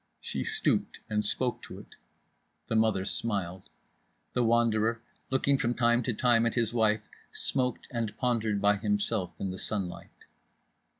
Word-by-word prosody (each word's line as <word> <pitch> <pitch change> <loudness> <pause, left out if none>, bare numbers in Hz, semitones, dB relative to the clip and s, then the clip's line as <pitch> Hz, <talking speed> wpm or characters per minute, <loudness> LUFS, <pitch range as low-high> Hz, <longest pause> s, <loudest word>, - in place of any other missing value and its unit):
She - - -3
stooped - - 0
and 105 0 +1
spoke 125 +4 +1
to - - -9
it. - - -13 0.7
The 115 - -2
mother 110 -4 +2
smiled. 95 -5 -2 0.6
The 125 - +2
Wanderer, 115 -1 +2 0.3
looking 135 +1 +2
from 120 0 0
time 120 0 +3
to 125 - -1
time 115 -1 +3
at 115 - -2
his 115 -2 +1
wife, 110 -2 +2 0.3
smoked 125 -3 -1
and 115 -4 -3
pondered 115 -5 0
by 100 +1 +3
himself 105 -2 0
in 95 - -2
the 95 - -7
sunlight. 95 -5 -5
110 Hz, 145 wpm, -29 LUFS, 105-120 Hz, 0.7 s, time